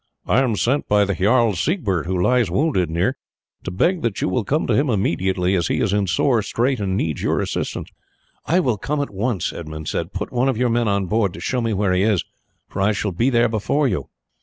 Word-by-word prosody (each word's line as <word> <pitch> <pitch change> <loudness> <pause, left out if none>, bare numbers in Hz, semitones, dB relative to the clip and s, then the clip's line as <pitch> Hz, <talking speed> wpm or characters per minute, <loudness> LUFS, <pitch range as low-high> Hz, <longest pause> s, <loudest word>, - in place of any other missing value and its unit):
"I - - +3
am 125 -5 +1
sent 130 +8 0
by 105 0 +4
the 100 - -1
Jarl 110 +4 +3
Siegbert, 95 - -1
who 90 0 -1
lies 120 +2 +2
wounded 95 - +1
near, 90 +11 0 0.5
to - - -4
beg 170 - +1
that 115 -8 -2
you - - 0
will 105 +5 0
come 150 +10 0
to - - +1
him 140 0 +2
immediately, 95 -3 0
as 85 -4 +1
he - - 0
is - - +1
in 100 -1 +2
a - - -7
sore 115 +6 +2
strait 125 +4 0
and 95 -2 -1
needs 80 -6 -2
your - - +1
assistance." - - -3 0.6
"I 180 +3 +3
will 125 -9 0
come 150 +6 -2
at 140 - -4
once," 105 -2 -1
Edmund 80 -2 -7
said. 85 +3 -3
"Put 100 +2 -5
one 125 +2 +2
of 130 - -1
your 125 0 +1
men 120 0 +1
on 100 -1 +1
board 100 -1 0
to - - -9
show 125 -1 -1
me 115 -1 -1
where 100 -1 +1
he 90 - +2
is, 105 -3 +2 0.4
for - - -4
I 105 +2 +3
shall 100 0 -2
be 115 +9 +1
there 120 -2 +3
before 115 +7 0
you." - - -3
105 Hz, 240 wpm, -21 LUFS, 95-125 Hz, 0.6 s, by